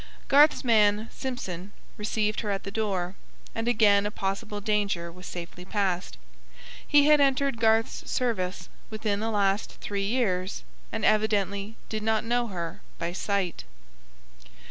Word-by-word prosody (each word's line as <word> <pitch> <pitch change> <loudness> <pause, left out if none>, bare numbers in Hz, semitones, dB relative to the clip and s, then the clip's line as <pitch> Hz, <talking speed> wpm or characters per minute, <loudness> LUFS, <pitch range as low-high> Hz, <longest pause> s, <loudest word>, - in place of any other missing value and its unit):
Garth's 290 +2 +6
man, 215 -2 +4
Simpson, 200 -8 -5 0.2
received 210 0 -1
her 215 - -3
at 195 -1 -1
the 195 - -6
door, 195 -4 -1 0.4
and 225 +1 -3
again 210 -3 +4
a - - -1
possible 205 +1 -3
danger 200 -5 0
was 180 +1 -11
safely 175 0 -7
passed. 185 - -1 0.7
He 290 -1 +6
had 300 -1 +6
entered 275 -2 +2
Garth's 225 0 +2
service 200 -7 -1 0.2
within 215 -2 -1
the 220 +1 -1
last 200 -1 +1
three 200 -1 -3
years 200 -6 0 0.3
and 220 -1 -1
evidently 210 -1 +1
did 215 -1 -3
not 220 0 +1
know 240 +1 +1
her 170 -5 -5 0.2
by 170 +1 -3
sight. 190 -2 -1
210 Hz, 140 wpm, -27 LUFS, 195-225 Hz, 0.7 s, Garth's